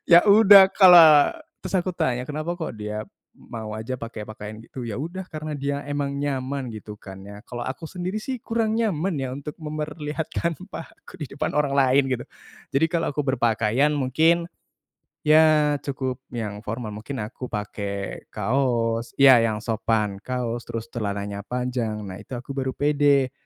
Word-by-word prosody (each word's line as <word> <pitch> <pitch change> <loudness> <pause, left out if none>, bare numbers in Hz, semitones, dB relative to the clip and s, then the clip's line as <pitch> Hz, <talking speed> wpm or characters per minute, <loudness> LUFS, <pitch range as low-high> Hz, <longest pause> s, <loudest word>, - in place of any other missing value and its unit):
Ya 170 +5 +8
udah 200 -2 +9
kalo 180 -3 +9 0.6
terus 185 - -6
aku 180 0 -2
tanya 130 -7 -1
kenapa 155 +4 -4
kok 160 -7 -4
dia 105 0 -5 0.3
mau 110 -2 -8
aja 115 +4 -5
pake 115 -2 -7
pakaian 110 +1 -9
gitu, 125 +1 -8
yaudah, 165 - -5
karena 155 -2 -6
dia 140 +1 -2
emang 145 -1 -2
nyaman 135 -2 -3
gitu 110 -1 -8
kan 95 -2 -11
ya. 105 +1 -11
Kalo 120 0 -6
aku 130 +4 -5
sendiri 185 +5 -4
sih 260 +1 -4
kurang 225 -1 -1
nyaman 195 -5 0
ya 130 -1 -3
untuk 145 +2 -8
memperlihatkan 155 +1 -3 0.2
pahaku 165 - -11
di 150 - -4
depan - - -2
orang 145 -2 0
lain, 135 0 +4
gitu. 120 - -5 0.5
Jadi 140 +4 +3
kalo 165 -1 -1
aku 145 0 -3
berpakaian, 120 +2 +2
mungkin, 160 +5 +2 0.8
ya 150 -1 +5
cukup 130 -2 -4 0.2
yang 105 -3 -4
formal. 110 0 -5
Mungkin 110 +7 -7
aku 125 +3 -7
pake 100 -2 -5
kaos 115 0 -1
ya, 135 -4 +8
yang 110 -2 +1
sopan 110 -3 -1
kaos, 120 -1 -4
terus 115 0 -6
celananya 100 -2 -3
panjang, 125 -1 -3
nah 95 +1 -8
itu 125 +4 -7
aku 125 +3 -7
baru 130 -1 -3
pede. 145 -2 +2
130 Hz, 160 wpm, -24 LUFS, 115-155 Hz, 0.8 s, udah